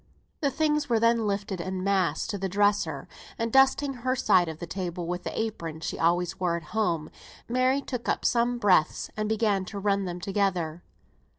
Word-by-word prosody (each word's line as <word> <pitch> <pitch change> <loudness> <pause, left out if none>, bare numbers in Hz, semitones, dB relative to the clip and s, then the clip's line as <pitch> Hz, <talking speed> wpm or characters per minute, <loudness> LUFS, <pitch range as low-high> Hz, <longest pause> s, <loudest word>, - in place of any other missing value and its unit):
The 285 - +1
things 300 -1 0
were 230 -2 +3
then 230 -1 +3
lifted 200 -2 -2
en 185 +1 -4
masse 185 -5 +1
to 205 - -4
the 190 0 -2
dresser; 200 -7 +1 0.3
and 230 0 -2
dusting 270 +1 +4
her 255 +1 -1
side 180 -8 +3
of 160 - -6
the 170 - -6
table 175 0 -4
with 175 +1 -3
the - - -4
apron 170 -8 -3
she 165 - -4
always 175 +3 +1
wore 175 -2 +1
at 170 - -8
home, 170 -8 0 0.4
Mary 255 +3 +2
took 250 -3 -4
up - - -1
some 240 +1 +2
breadths 190 -8 +2
and 215 0 -2
began 210 -3 +1
to 200 - -7
run 200 -1 +1
them 175 -1 -4
together. 180 -4 -1
200 Hz, 190 wpm, -27 LUFS, 175-230 Hz, 0.4 s, dusting